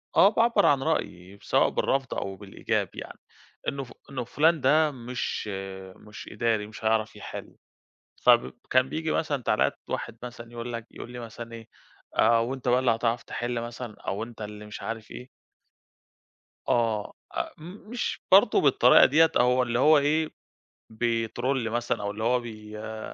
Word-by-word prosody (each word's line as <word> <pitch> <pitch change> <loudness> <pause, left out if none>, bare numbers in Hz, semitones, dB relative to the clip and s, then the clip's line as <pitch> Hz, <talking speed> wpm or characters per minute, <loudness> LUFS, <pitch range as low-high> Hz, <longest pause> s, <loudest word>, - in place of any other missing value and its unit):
آه، 195 - +7
باعبّر 230 +2 +3
عن 135 -2 +4
رأيي 100 - -3
سواء - - +3
بالرفض 135 -1 0
أو 95 0 -4
بالإيجاب 100 0 -2
يعني، - - -9 0.5
إنه 140 -1 -2
ف 120 - -13 0.2
إنه 130 -3 -3
فلان 155 +6 +2
ده 150 +3 +4
مش 125 -3 -4 0.5
مش 105 -1 -11
إداري 110 -3 0
مش 110 0 -10
هيعرف 110 0 +1
يحل - - -8 0.7
فبب 65 +1 +5 0.2
كان 130 +1 +3
بيجي 160 0 -2
مثلًا 145 -5 -1
تعليقات - - +1
واحد 115 - -4
مثلًا 120 -1 -9
يقول 120 0 -6
لك 115 0 -5
يقول 120 - -9
لي 125 - -7
مثلًا 115 0 -8
إيه: 115 -1 -9 0.5
"آآ، 115 - +5
وأنت 125 +2 -3
بقى 125 +1 +4
اللي 130 -2 +3
هتعرف 115 +1 0
تحل 120 -1 -3
مثلًا 120 -1 -7
أو 100 +3 -3
أنت 115 -1 -10
اللي 105 0 -7
مش 105 - -8
عارف 115 -1 -6
إيه؟" 125 +1 -9 1.4
آه، 115 -3 +1 0.2
أ - - -1
م 155 - -12 0.3
مش 240 -2 -3
برضو 200 +2 +7
بالطريقة 130 -3 +6
دي. 155 +5 +5
أو 125 -4 +3
اللي 120 -1 -1
هو 155 +3 +6
إيه 155 +2 +2 0.6
بيترول 115 +2 -1
مثلًا، 120 -1 -1
أو 100 - -2
اللي 105 +2 -4
هو 125 +2 +3
بي 110 -2 -9
آآ، 110 0 -6
120 Hz, 165 wpm, -27 LUFS, 110-135 Hz, 1.4 s, آه